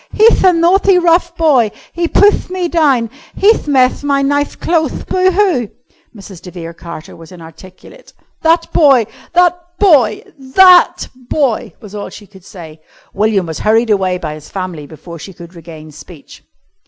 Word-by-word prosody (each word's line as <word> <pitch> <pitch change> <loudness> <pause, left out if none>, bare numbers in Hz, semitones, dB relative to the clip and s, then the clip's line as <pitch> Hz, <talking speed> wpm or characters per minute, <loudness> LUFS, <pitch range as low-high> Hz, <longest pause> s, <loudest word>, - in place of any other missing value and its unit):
"He'th 445 +2 +3
a 370 - +6
nathty, 360 +3 +2
rough 345 0 +1
boy! 275 -9 +2 0.2
He 340 0 -2
puthed 410 +3 +2
me 365 -1 -3
down. 275 -9 0 0.2
He'th 415 -4 +2
methed 260 -1 +1
my 280 -1 0
nith 285 +1 -2
clotheth. 330 -2 -2
Boo 370 0 +1
hoo!" 360 - 0 0.5
Mrs. 195 -3 -13
de 180 - -11
Vere 170 -2 -9
Carter 170 +1 -11
was 165 0 -15
inarticulate. 175 +2 -15 0.3
"That 330 +1 0
boy... 270 -7 +4 0.3
that 355 0 +2 0.2
boy... 285 - +2 0.2
that 360 +7 +4
boy!" 255 -1 -3
was 210 -3 -13
all 205 -1 -7
she 210 - -13
could 190 -2 -19
say. 160 -5 -13 0.3
William 205 -2 0
was 160 -2 -7
hurried 225 +1 +1
away 190 -3 0
by 155 -4 -6
his 155 -1 -13
family 180 -6 -7
before 170 +2 -12
she 195 - -11
could 170 0 -14
regain 160 -2 -12
speech. 150 +1 -15
230 Hz, 160 wpm, -14 LUFS, -, 0.5 s, a